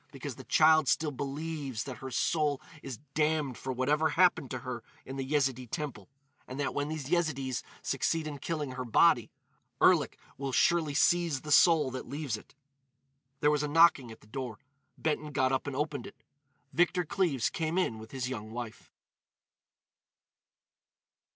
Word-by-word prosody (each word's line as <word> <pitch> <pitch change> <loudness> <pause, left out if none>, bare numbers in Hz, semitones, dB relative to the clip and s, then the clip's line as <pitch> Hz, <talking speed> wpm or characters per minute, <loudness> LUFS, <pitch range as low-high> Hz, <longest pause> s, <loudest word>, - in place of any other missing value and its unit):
Because - - -6
the - - -10
child 155 -2 +5
still 150 +4 +2
believes 140 -2 -4
that 130 -3 -7
her 135 - -6
soul 145 +2 +1 0.2
is 130 -4 -6 0.2
damned 150 -4 +1
for 130 - -5
whatever 145 +5 +1
happened 175 -6 +3
to 130 - -3
her 125 -2 -4 0.2
in 135 - -7
the 135 - -3
Yezidee 130 -3 0
temple; 135 -9 -5 0.4
and 130 +2 -7
that 140 - -1
when 145 +1 -1
these 155 -2 -5
Yezidees 140 -7 0 0.2
succeed 165 -1 0
in 145 -2 -5
killing 150 -1 -3
her 130 0 -4
body, 120 - +4 0.5
Erlik - - +4 0.2
will 140 -1 -2
surely 155 +1 +2
seize 165 -3 +3
the 150 - -6
soul 155 -3 +6
that 130 - -6
leaves 145 -5 -3
it." 105 - -13 0.9
There 150 - +4
was 150 -1 +1
a 150 - -1
knocking 150 -5 +5
at 110 - -13
the - - -19
door. 125 -1 -5 0.4
Benton 150 -1 -1
got 130 -2 +2
up 130 +2 -1
and 140 - -3
opened 145 -3 -2
it. - - -12 0.6
Victor 175 +1 +2
Cleves 150 -8 0
came 165 +1 -2
in 115 -12 0
with 110 0 -10
his 130 -1 -3
young 110 -4 -5
wife. 115 -1 -7
140 Hz, 165 wpm, -30 LUFS, 130-155 Hz, 0.9 s, soul